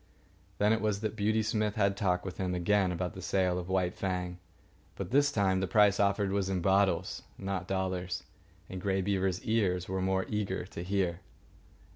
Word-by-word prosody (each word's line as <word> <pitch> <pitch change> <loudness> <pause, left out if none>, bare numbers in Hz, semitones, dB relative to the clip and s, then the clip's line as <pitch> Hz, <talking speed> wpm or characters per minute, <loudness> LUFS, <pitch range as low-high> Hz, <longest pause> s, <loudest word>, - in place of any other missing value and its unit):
Then 105 +2 +4
it 110 - 0
was 105 -2 0
that 110 -1 -2
Beauty 110 +1 +1
Smith 105 -1 0
had 100 -2 +2
talk 90 -3 0
with 95 - -6
him 90 -1 -1
again 95 +1 +2
about 90 0 -3
the 95 - -8
sale 90 0 +1
of 90 0 -7
White 90 -1 +1
Fang; 90 -2 -3 0.6
but - - -5
this 145 +2 +4
time 95 -3 +2
the 95 - -1
price 100 +1 +4
offered 100 0 +2
was 100 -1 0
in 95 -1 0
bottles, 95 +2 +2 0.2
not 95 -2 -3
dollars, 95 -1 -2 0.4
and 95 -1 -6
Grey 95 -1 0
Beaver's 95 -2 0
ears 95 -5 +1
were 95 0 -2
more 95 0 +1
eager 100 -4 -2
to 85 - -7
hear. 90 -2 0
95 Hz, 185 wpm, -31 LUFS, 90-100 Hz, 0.6 s, Then